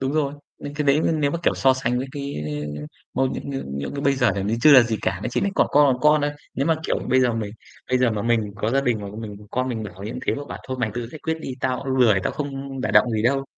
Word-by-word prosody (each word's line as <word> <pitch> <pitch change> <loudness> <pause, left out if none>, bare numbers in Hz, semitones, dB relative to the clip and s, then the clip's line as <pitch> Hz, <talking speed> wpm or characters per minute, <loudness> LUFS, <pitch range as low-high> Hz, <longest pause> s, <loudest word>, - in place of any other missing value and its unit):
đúng 135 +1 -1
rồi, 145 -2 0 0.4
cái 150 - 0
đấy 140 +2 +4
nếu 145 -2 +1
mà, 170 - -2
kiểu, - - +2
so 130 -1 +4
sánh 125 -1 -1
với, 130 - -3
cái, 140 -1 -5 0.4
ơ, 75 - -6 0.3
mâu 130 +1 +2
những, 135 - -4 0.4
cái, 140 - -3
bây 140 - +4
giờ 130 - +3 0.2
thì 115 - +1
chưa 155 - +8
là 130 -3 +10
gì 115 -2 -1
cả, 90 0 -1
nó 125 - -1
chỉ - - 0
là 200 - +1
cỏn - - +3
con 145 -2 +5
còn 125 - -8
con 150 0 +5
thôi. 145 0 0 0.2
Nếu 135 - 0
mà, 165 - +4
kiểu, - - +1
bây 130 - +5
giờ 125 -2 +3
mình 110 -3 -3 0.4
bây 130 - +3
giờ 125 -2 +3
mà 105 -2 -2
mình 120 -1 +2 0.2
có 105 +2 -1
gia 135 +3 +3
đình 120 -5 0
mà 100 - -6
mình 105 -2 -7
con 130 +1 -1
mình 115 -3 -3
mà 105 - -6
bảo 95 +2 -12
như 110 - -4
thế - - +2
mà 145 - -5
bảo - - -6
thôi 130 - -2
mày 115 -3 0
tự 120 -1 -3
giải 155 - -10
quyết 160 0 0
đi, 135 - -5
tao 130 -1 0
cũng 135 -1 -2
lười, 110 -7 +5
tao - - -1
không 140 -2 -5
đả - - -1
động 120 - +5
gì 110 -1 0
đâu. 135 +3 +2
130 Hz, 300 wpm, -23 LUFS, 115-140 Hz, 0.4 s, là